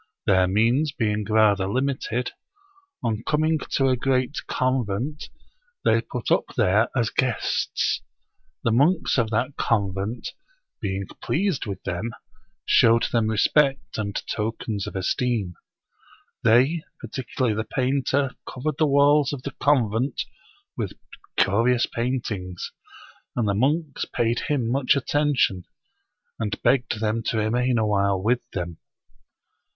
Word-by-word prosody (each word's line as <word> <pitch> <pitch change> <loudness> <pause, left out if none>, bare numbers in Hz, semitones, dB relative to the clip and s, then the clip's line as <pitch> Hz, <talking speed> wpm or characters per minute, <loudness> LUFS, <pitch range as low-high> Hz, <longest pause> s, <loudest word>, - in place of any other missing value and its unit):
Their 95 -3 +4
means 115 +10 +2
being 105 -5 -1
rather 105 -3 +4
limited, 125 +1 -1 0.7
on 110 -2 -1
coming 155 +1 +1
to 135 - +3
a 130 - +3
great 130 +2 0
convent, 130 +2 -1 0.6
they - - +4
put - - -5
up - - +1
there 110 0 +4
as 115 -4 +1
guests. 125 -3 0 0.6
The 115 - +2
monks 145 +5 +3
of 115 -2 +1
that 120 +5 -1
convent, 100 +1 -1 0.5
being 100 -2 -2 0.2
pleased 180 - 0
with 100 - -5
them, 100 +6 -3 0.5
showed 115 +1 +5
them 115 -2 +2
respect 135 +5 +2
and 100 -2 -3
tokens 110 -2 -3
of - - -7
esteem. 100 0 0 0.9
They, 130 +9 +4 0.2
particularly 130 -3 -2
the 110 - -1
painter, 135 +2 0 0.2
covered 140 +3 -3
the 155 - +4
walls 145 0 +4
of 140 -3 -6
the 140 - -4
convent 125 -2 +1 0.5
with - - -3 0.4
curious 115 +5 +3
paint 120 +1 -2
ings; 90 -3 -5 0.6
and 120 -3 0
the 100 - +2
monks 145 +7 0
paid 120 0 +1
him 135 -6 0
much 130 +3 +2
attention, 140 -9 +1 0.7
and 105 -2 -2
begged 120 -2 +2
them 110 +1 0
to 115 - 0
remain 120 +3 +1
awhile 100 -3 +2
with 115 +6 +1
them. 85 -3 -4
120 Hz, 125 wpm, -24 LUFS, 105-135 Hz, 0.9 s, showed